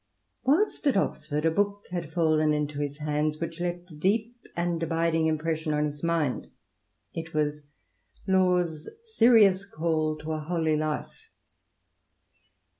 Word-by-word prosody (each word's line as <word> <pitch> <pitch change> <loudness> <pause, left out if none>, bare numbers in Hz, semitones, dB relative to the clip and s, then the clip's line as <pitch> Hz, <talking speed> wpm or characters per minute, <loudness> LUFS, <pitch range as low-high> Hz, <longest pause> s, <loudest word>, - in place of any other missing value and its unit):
Whilst 305 +4 +2
at 270 - +3
Oxford 150 -4 -1
a 165 - +4
book 205 +3 0
had 170 -3 -4
fallen 155 -3 +2
into 150 -1 -2
his 145 -1 -3
hands 150 0 -1
which 165 0 -5
left 175 0 -4
a - - -10
deep 215 +9 0 0.2
and 170 -1 -1
abiding 165 0 +1
impression 160 0 -1
on 150 0 +1
his 150 0 -6
mind. 165 -6 0 0.6
It 165 -1 -6
was 150 0 0 0.7
LaVs 180 -4 +2 0.2
Serious 225 - +5
Call 155 -3 -1
to 155 +1 -6
a 155 - -2
Holy 160 0 0
Life. 155 0 -4
160 Hz, 135 wpm, -27 LUFS, 155-180 Hz, 0.7 s, Serious